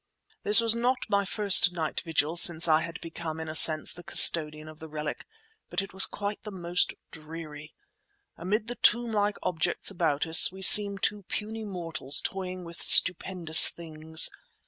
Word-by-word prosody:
This 210 Hz, +2 st, +5 dB
was 230 Hz, -1 st, +1 dB
not 245 Hz, +2 st, -2 dB
my 200 Hz, 0 st, -2 dB
first 195 Hz, -3 st, +3 dB
night 160 Hz, -3 st, -6 dB
vigil 160 Hz, -1 st, -3 dB
since 170 Hz, -1 st, +2 dB
I 155 Hz, 0 st, +1 dB
had 165 Hz, 0 st, -10 dB
become 165 Hz, -1 st, -10 dB
in 160 Hz, -, -9 dB
a 155 Hz, -, -8 dB
sense 155 Hz, 0 st, +5 dB
the 175 Hz, -, -14 dB
custodian 155 Hz, -3 st, 0 dB
of 155 Hz, 0 st, -15 dB
the 160 Hz, -, -12 dB
relic, 150 Hz, 0 st, -9 dB, 0.4 s
but -, -, -5 dB
it 195 Hz, -1 st, -8 dB
was 190 Hz, -, +2 dB
quite 205 Hz, 0 st, -8 dB
the 215 Hz, -, -11 dB
most 175 Hz, -2 st, -4 dB, 0.2 s
dreary. 155 Hz, -1 st, -13 dB, 0.6 s
Amid 205 Hz, +6 st, -5 dB
the 240 Hz, -, -7 dB
tomb 235 Hz, +1 st, 0 dB
like 205 Hz, -1 st, -3 dB
objects 175 Hz, +2 st, -5 dB
about 160 Hz, -6 st, -4 dB
us 160 Hz, +2 st, +6 dB
we 190 Hz, +1 st, -11 dB
seemed 200 Hz, 0 st, +6 dB
two 210 Hz, -1 st, -2 dB
puny 220 Hz, +1 st, -7 dB
mortals 165 Hz, -7 st, -3 dB
toying 185 Hz, -1 st, -8 dB
with 170 Hz, 0 st, -12 dB
stupendous 180 Hz, -3 st, +4 dB
things. 160 Hz, -1 st, -2 dB
175 Hz, 170 wpm, -24 LUFS, 160-200 Hz, 0.6 s, us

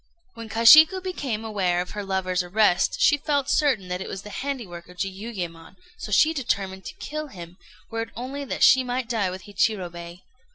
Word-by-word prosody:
When 230 Hz, -1 st, -9 dB
Kashiku 310 Hz, -, +7 dB
became 275 Hz, -, -4 dB
aware 190 Hz, -5 st, 0 dB
of 180 Hz, -, -4 dB
her 205 Hz, -, -5 dB
lover's 190 Hz, -1 st, -1 dB
arrest, 180 Hz, +1 st, +1 dB
she 290 Hz, -, +4 dB
felt 285 Hz, -2 st, -1 dB
certain 255 Hz, -11 st, +1 dB
that 180 Hz, +1 st, -3 dB
it -, -, -6 dB
was 195 Hz, -, -6 dB
the 210 Hz, -, -10 dB
handiwork 220 Hz, -13 st, -6 dB
of 180 Hz, -, -15 dB
Jiuyémon; 190 Hz, -4 st, -6 dB, 0.2 s
so 445 Hz, -, -8 dB
she 315 Hz, +1 st, +4 dB
determined 195 Hz, -9 st, -3 dB
to -, -, -8 dB
kill 305 Hz, 0 st, -6 dB
him, 175 Hz, -6 st, -11 dB, 0.3 s
were 225 Hz, 0 st, -2 dB
it 225 Hz, -, -5 dB
only 265 Hz, +4 st, -5 dB
that -, -, -2 dB
she 260 Hz, 0 st, +6 dB
might 250 Hz, -1 st, -3 dB
die 220 Hz, -6 st, 0 dB
with 185 Hz, 0 st, -8 dB
Hichirobei. 180 Hz, -4 st, -3 dB
210 Hz, 190 wpm, -24 LUFS, 185-260 Hz, 0.3 s, Kashiku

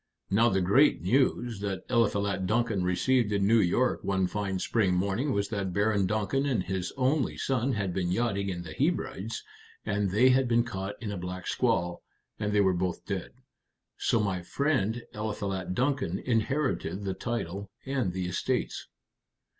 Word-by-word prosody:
Now 115 Hz, +4 st, +5 dB
the 95 Hz, -2 st, +1 dB
great 115 Hz, +10 st, +4 dB
news 120 Hz, +1 st, +1 dB
that 100 Hz, -2 st, -3 dB
Eliphalet 100 Hz, -5 st, +1 dB
Duncan 110 Hz, -3 st, +1 dB
received 105 Hz, +5 st, +2 dB
in 100 Hz, -1 st, +2 dB
New 115 Hz, +3 st, +5 dB
York 115 Hz, +7 st, +2 dB
one 95 Hz, -1 st, +1 dB
fine 95 Hz, +1 st, -2 dB
spring 95 Hz, -1 st, +1 dB
morning 100 Hz, +10 st, 0 dB
was 100 Hz, -2 st, 0 dB
that 100 Hz, -4 st, -2 dB
Baron 100 Hz, -1 st, +2 dB
Duncan 110 Hz, +7 st, 0 dB
and 125 Hz, -9 st, +1 dB
his 90 Hz, -1 st, -3 dB
only 135 Hz, +2 st, +1 dB
son 130 Hz, 0 st, 0 dB
had 100 Hz, -4 st, -1 dB
been 90 Hz, -1 st, -1 dB
yachting 100 Hz, -2 st, 0 dB
in 85 Hz, -2 st, -4 dB
the 80 Hz, -2 st, -8 dB
Hebrides, 105 Hz, +7 st, -1 dB, 0.4 s
and 100 Hz, -2 st, 0 dB
they 115 Hz, +7 st, +5 dB
had 130 Hz, 0 st, +4 dB
been 120 Hz, 0 st, +3 dB
caught 100 Hz, -4 st, -5 dB
in 105 Hz, -, -3 dB
a 100 Hz, -, -4 dB
black 90 Hz, +1 st, -5 dB
squall, 85 Hz, 0 st, 0 dB, 0.4 s
and 105 Hz, -, -1 dB
they 105 Hz, 0 st, +4 dB
were 95 Hz, -2 st, +3 dB
both 90 Hz, 0 st, -2 dB
dead. -, -, -3 dB, 0.7 s
So 115 Hz, -, +1 dB
my 95 Hz, -4 st, 0 dB
friend 120 Hz, -, 0 dB
Eliphalet 100 Hz, -4 st, -3 dB
Duncan 130 Hz, -8 st, 0 dB
inherited 125 Hz, -3 st, -1 dB
the 95 Hz, -1 st, -1 dB
title 100 Hz, -3 st, -4 dB, 0.2 s
and 130 Hz, -8 st, 0 dB
the 90 Hz, 0 st, -3 dB
estates." 90 Hz, -, -2 dB
100 Hz, 165 wpm, -29 LUFS, 95-120 Hz, 0.7 s, Now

